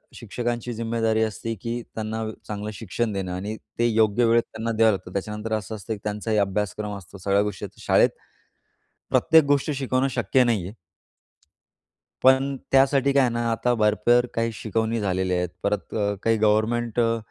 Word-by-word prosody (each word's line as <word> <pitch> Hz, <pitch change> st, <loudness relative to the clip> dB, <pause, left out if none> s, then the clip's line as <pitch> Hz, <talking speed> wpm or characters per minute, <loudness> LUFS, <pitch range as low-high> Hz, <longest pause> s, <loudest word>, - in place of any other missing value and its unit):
शिक्षकांची 120 Hz, +1 st, -4 dB
ज़िम्मेदारी 115 Hz, -1 st, 0 dB
असते, 110 Hz, +1 st, -3 dB
की 120 Hz, +1 st, -3 dB
त्यांना 110 Hz, 0 st, -3 dB
अ, 110 Hz, -1 st, -3 dB, 0.2 s
चांगलं 105 Hz, 0 st, -4 dB
शिक्षण 115 Hz, +2 st, -3 dB
देणं 95 Hz, -2 st, -3 dB
आणि 100 Hz, +4 st, -4 dB, 0.2 s
ते 120 Hz, -, +4 dB
योग्य 110 Hz, 0 st, +3 dB
वेळेत 115 Hz, 0 st, +4 dB
त्यांना 110 Hz, +1 st, -3 dB
द्यावं 110 Hz, 0 st, +5 dB
लागतं. 90 Hz, -2 st, -5 dB
त्याच्यानंतर 105 Hz, +3 st, -3 dB
असं 110 Hz, 0 st, -3 dB
असतं, 110 Hz, +2 st, -5 dB
की 105 Hz, -, -7 dB
त्यांचाही 105 Hz, +1 st, -2 dB
अभ्यासक्रम 105 Hz, +1 st, -1 dB
असतो. 100 Hz, +1 st, -12 dB
सगळ्या 100 Hz, +1 st, +1 dB
गोष्टीत 105 Hz, -2 st, -6 dB
शाळेत -, -, +4 dB, 1.0 s
प्रत्येक 160 Hz, -1 st, +5 dB
गोष्ट 145 Hz, +1 st, +1 dB
शिकवणं 130 Hz, 0 st, 0 dB
शक्य 130 Hz, +1 st, +2 dB
नाहीये. 105 Hz, -6 st, -1 dB, 1.5 s
पण 130 Hz, +1 st, +4 dB, 0.2 s
त्यासाठी 135 Hz, 0 st, +4 dB
काय 140 Hz, -, +5 dB
आहे 125 Hz, -, +2 dB
ना, 120 Hz, -, -1 dB
आता 120 Hz, +2 st, +1 dB
भरपूर 110 Hz, +3 st, +3 dB
काही 115 Hz, 0 st, 0 dB
शिकवणी 110 Hz, +1 st, -1 dB
झालेल्या 95 Hz, -2 st, 0 dB
आहेत. 90 Hz, -1 st, -1 dB
परत 100 Hz, +1 st, -2 dB
अ, 105 Hz, -2 st, 0 dB
काही 115 Hz, 0 st, +3 dB
गव्हर्नमेंट 110 Hz, +2 st, +1 dB
अ, 115 Hz, -1 st, +2 dB
110 Hz, 165 wpm, -24 LUFS, 105-120 Hz, 1.5 s, द्यावं